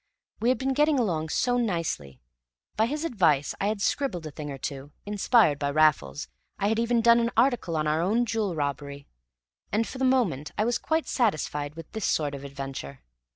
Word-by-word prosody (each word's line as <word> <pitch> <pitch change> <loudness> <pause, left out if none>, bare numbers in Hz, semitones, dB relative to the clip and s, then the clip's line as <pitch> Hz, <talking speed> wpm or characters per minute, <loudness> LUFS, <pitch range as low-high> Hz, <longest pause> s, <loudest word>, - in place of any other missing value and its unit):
We 235 - +2
had 255 - +3
been 265 0 -1
getting 295 +1 +3
along 165 -10 0
so 245 +9 +1
nicely: 165 - -2 0.6
by 220 +1 +2
his 300 +5 -3
advice 165 - +2
I 200 - +1
had 210 -1 -1
scribbled 220 - -1
a 155 - -6
thing 150 +1 -7
or 140 - -5
two; 140 +2 -6
inspired 205 - +3
by 140 - 0
Raffles, 140 - +2 0.3
I 200 +1 +1
had 220 +1 +1
even 235 0 +2
done 235 +1 +6
an 235 0 +1
article 235 -9 +2
on 155 - 0
our 155 +1 +1
own 220 +7 +2
jewel 215 -6 -1
robbery; 140 -1 -4 0.7
and 225 +2 +1
for 260 - -8
the - - -1
moment 205 - +1
I 215 - +2
was 240 0 0
quite 320 0 -1
satisfied 150 - -1
with 165 -1 -10
this 220 -2 -3
sort 145 -2 0
of 140 -1 -7
adventure. 135 - -7
180 Hz, 200 wpm, -27 LUFS, 145-235 Hz, 0.7 s, done